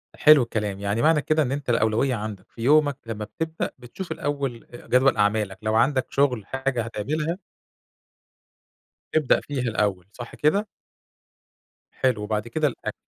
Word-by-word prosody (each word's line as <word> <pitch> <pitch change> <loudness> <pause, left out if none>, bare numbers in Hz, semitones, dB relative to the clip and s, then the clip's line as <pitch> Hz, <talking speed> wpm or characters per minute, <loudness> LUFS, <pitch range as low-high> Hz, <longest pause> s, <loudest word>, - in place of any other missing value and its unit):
حلو 150 -4 +7
الكلام، 105 -4 -3
يعني 100 +3 -1
معنى 155 -1 +4
كده 155 +2 +1
إن 130 - -2
أنت 140 -1 -4
الأولوية 115 +3 +2
عندك 105 -3 -7
في 115 - -11
يومك 145 +2 +4
لمّا 110 -2 -5
بتبدأ، 160 +10 -4
بتشوف 130 +9 -8
الأول 140 -5 -3
آآ 120 - -11
جدول 130 -1 +4
أعمالك، 105 -2 +1
لو 110 0 0
عندك 130 +3 +3
شُغل 125 -7 +1
حاجة 135 0 -2
هتعملها 150 - -3 1.7
تبدأ 155 -4 +3
فيها 145 -3 -4
الأول، 105 -6 0
صح 120 -1 -9
كده؟ 200 +8 +2 1.2
حلو 125 -5 0
وبعد 105 +1 -2
كده 155 +5 +1
الأك 135 - -5
125 Hz, 145 wpm, -24 LUFS, 110-145 Hz, 1.7 s, حلو